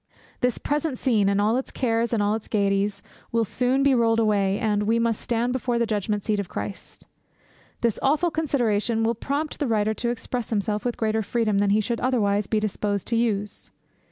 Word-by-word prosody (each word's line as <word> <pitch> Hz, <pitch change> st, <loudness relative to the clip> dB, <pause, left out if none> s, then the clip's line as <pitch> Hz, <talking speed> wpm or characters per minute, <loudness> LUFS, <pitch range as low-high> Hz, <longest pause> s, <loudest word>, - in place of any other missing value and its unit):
This 250 Hz, -1 st, +1 dB
present 295 Hz, -2 st, -1 dB
scene, 215 Hz, -7 st, +2 dB
and 200 Hz, 0 st, +1 dB
all 215 Hz, +4 st, +2 dB
its 265 Hz, -, -3 dB
cares 230 Hz, -2 st, 0 dB
and 220 Hz, -3 st, +1 dB
all 205 Hz, +1 st, +2 dB
its 220 Hz, -1 st, -4 dB
gaieties, 200 Hz, 0 st, 0 dB, 0.3 s
will 230 Hz, -1 st, +2 dB
soon 250 Hz, +5 st, +1 dB
be 280 Hz, -1 st, +4 dB
rolled 230 Hz, -2 st, +3 dB
away, 200 Hz, -3 st, +2 dB
and 210 Hz, -3 st, 0 dB
"we 220 Hz, +2 st, +2 dB
must 230 Hz, -1 st, 0 dB
stand 240 Hz, +1 st, 0 dB
before 250 Hz, -2 st, -1 dB
the 235 Hz, -, +2 dB
judgment 210 Hz, -2 st, -2 dB
seat 210 Hz, -2 st, 0 dB
of 195 Hz, -3 st, -4 dB
Christ." 100 Hz, 0 st, -7 dB, 0.8 s
This 235 Hz, -3 st, +1 dB
awful 310 Hz, +5 st, +2 dB
consideration 235 Hz, -8 st, 0 dB
will 230 Hz, +1 st, +2 dB
prompt 285 Hz, +6 st, -3 dB
the 290 Hz, -, 0 dB
writer 215 Hz, -1 st, +1 dB
to 235 Hz, +2 st, -2 dB
express 240 Hz, 0 st, -4 dB
himself 210 Hz, 0 st, -1 dB
with 245 Hz, -, -1 dB
greater 220 Hz, 0 st, 0 dB
freedom 215 Hz, -2 st, 0 dB
than 200 Hz, 0 st, +2 dB
he 210 Hz, +2 st, +3 dB
should 235 Hz, +2 st, -2 dB
otherwise 210 Hz, -6 st, +1 dB
be 215 Hz, -, +1 dB
disposed 205 Hz, -1 st, -2 dB
to 230 Hz, -, +1 dB
use. 210 Hz, -3 st, -1 dB
225 Hz, 200 wpm, -24 LUFS, 205-245 Hz, 0.8 s, be